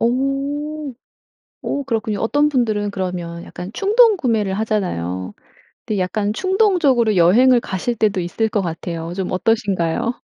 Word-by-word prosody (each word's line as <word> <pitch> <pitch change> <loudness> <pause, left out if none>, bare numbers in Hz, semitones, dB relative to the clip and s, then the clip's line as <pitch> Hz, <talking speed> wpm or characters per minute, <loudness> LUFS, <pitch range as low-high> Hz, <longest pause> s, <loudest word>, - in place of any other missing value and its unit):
오. 275 +4 -1 0.7
오 280 - -3
그렇군요. 220 -5 -2
어떤 290 +6 +2
분들은 220 -7 0
그러면 175 -3 -4
약간 180 +2 -8
충동구매를 380 - +3
하잖아요. 95 - -2 0.5
근데 215 - -1
약간 205 +3 -1
충동적으로 340 - +2
여행을 240 +9 +5
가실 210 +3 -3
때도 205 -3 +1
있을 180 +6 -1
것 210 - 0
같아요. 170 -1 -4
좀 190 -1 -3
어떠신가요? 200 +1 0
220 Hz, 305 characters per minute, -19 LUFS, 185-275 Hz, 0.7 s, 여행을